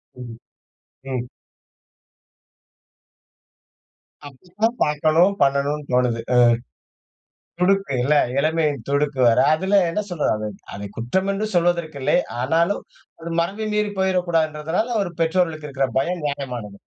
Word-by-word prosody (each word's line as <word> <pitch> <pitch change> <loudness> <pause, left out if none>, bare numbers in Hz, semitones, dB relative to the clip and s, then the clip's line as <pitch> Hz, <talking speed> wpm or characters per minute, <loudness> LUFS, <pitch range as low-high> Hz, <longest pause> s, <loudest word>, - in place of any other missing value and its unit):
ம், 120 -2 -9 0.7
ம். 125 -2 -3 3.0
அப்டிதான் 185 - -3
பாக்கணும், 155 +5 +3
பண்ணனும்னு 140 +1 0
தோணுது 125 -2 +2
அ. - - +5 1.2
துடுக்கு 195 -2 +2
இல்ல 150 +4 +3 0.2
இளமையின் 155 0 +1
துடுக்கு 140 0 0
வேற, 115 - +4 0.2
அதுல 190 +5 0
என்ன 170 - -2
சொல்றது? 175 -4 0
அது 105 0 -4 0.3
அதை 100 0 -6
குற்றம் 190 +13 -1
என்று 205 +2 -2
சொல்வதற்கு 170 -3 +1
இல்லை. - - +2 0.2
ஆனாலும், 165 +9 +1 0.4
அது 165 +1 -7
மரபை 200 +6 -2
மீறி 210 0 0
போயிரக்கூடாதுன்றனால 175 -1 0 0.2
ஒரு 175 - -5
பெற்றோர்களுக்கு 165 -2 0
இருக்குற 135 -1 -1
பயம் 170 +4 -2
நியாயமானது. 125 -8 -4
155 Hz, 110 wpm, -22 LUFS, 135-180 Hz, 3.0 s, அ